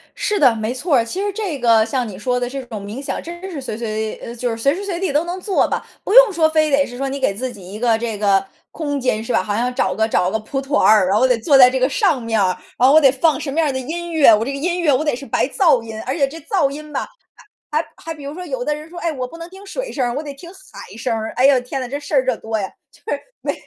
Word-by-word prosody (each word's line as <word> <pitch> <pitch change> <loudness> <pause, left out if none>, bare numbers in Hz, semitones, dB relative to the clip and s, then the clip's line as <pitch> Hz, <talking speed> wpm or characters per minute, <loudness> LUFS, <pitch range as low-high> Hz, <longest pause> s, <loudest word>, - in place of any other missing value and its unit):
是 420 -1 -1
的， 255 -5 +5
没 220 +2 -2
错 280 +4 0
儿。 230 - +2
其 365 +12 -4
实 410 0 -1
这 385 -9 -3
个 230 -3 +4
像 245 +1 -2
你 195 -4 -8
说 250 +4 -1
的 245 0 -2
这 270 +1 -5
种 220 -4 -7
冥 210 +6 -6
想， 280 - -4
真 345 +1 -8
的 385 - -6
是 315 -7 -6
随 235 -4 -5
随 220 -1 -3
呃， 235 - -9
就 245 +1 -2
是 225 - -3
随 275 +6 +2
时 390 - -5
随 365 -4 -3
地 380 -4 -1
都 295 +3 +2
能 355 +2 -4
做 380 +1 +1
吧， - - -3 0.2
不 400 - -2
用 - - +8
说 320 -2 +3
非 310 -1 +2
得 280 0 +3
是 245 -1 -9
说 275 +1 -2
你 275 +1 -4
给 260 -7 +1
自 255 +5 -4
己 190 -4 -12
一 210 - -7
个 230 -1 +2
这 225 -2 -3
个 200 -2 +2 0.3
空 290 -3 -3
间 235 -4 0
是 230 - -4
吧？ - - +3
好 205 +2 -2
像 245 +3 -1
找 190 -6 0
个 220 +2 +1
找 180 -5 +1
个 220 - -1
蒲 270 +5 -4
团 275 +2 0
儿， 210 -4 +6
然 195 +3 +2
后 255 +4 +4
得 250 -2 +2
坐 275 +5 +4
在 250 -1 +9
这 260 +1 -1
个 255 - +3
上 365 - +1
面 225 -1 0
儿， 190 - +3 0.3
然 250 - +5
后 275 - +5
我 315 - +7
得 270 -3 +6
放 300 +4 +1
什 275 - -4
么 305 - -1
样 315 -2 +2
儿 - - 0
的 260 - -3
音 340 +6 -5
乐， 300 -8 +6
我 215 - -1
这 275 - -3
个 275 - -4
音 350 +5 -1
乐 315 -4 +3
我 260 +4 +1
得 295 -5 0
是 270 +3 -9
白 - - +1
噪 310 -10 +3
音， 220 -1 -7
而 260 - -2
且 280 -4 +2
这 300 +4 -9
噪 325 -2 +1
音 300 +2 -9
吧 - - -3 0.6
还 305 - +1
还 - - -18
还 325 0 -7
比 295 -2 -11
如 285 +1 -6
说 360 +2 -7
有 265 -7 -4
的 300 +2 0
人 305 +1 -9
说： 345 +1 -10
“哎， 335 - -1
我 255 -4 -4
不 330 +7 -12
能 335 0 -8
听 385 +2 -13
水 - - -5
声 265 - -1
儿， 240 - -2
我 290 - -3
得 290 -2 -7
听 340 +5 -12
海 380 - -13
声 230 +1 -2
儿。” 220 0 -4
哎 255 - +5
呦， 275 -2 +5
天 250 +2 -5
哪， 255 - -4
这 280 +3 -3
事 295 - -6
儿 265 -2 +4
可 255 -3 +1
多 220 0 -3
呀， 195 -2 -3 0.2
就 - - -22
是 285 - -2 0.2
没 - - -1
270 Hz, 345 characters per minute, -19 LUFS, 230-315 Hz, 0.6 s, 在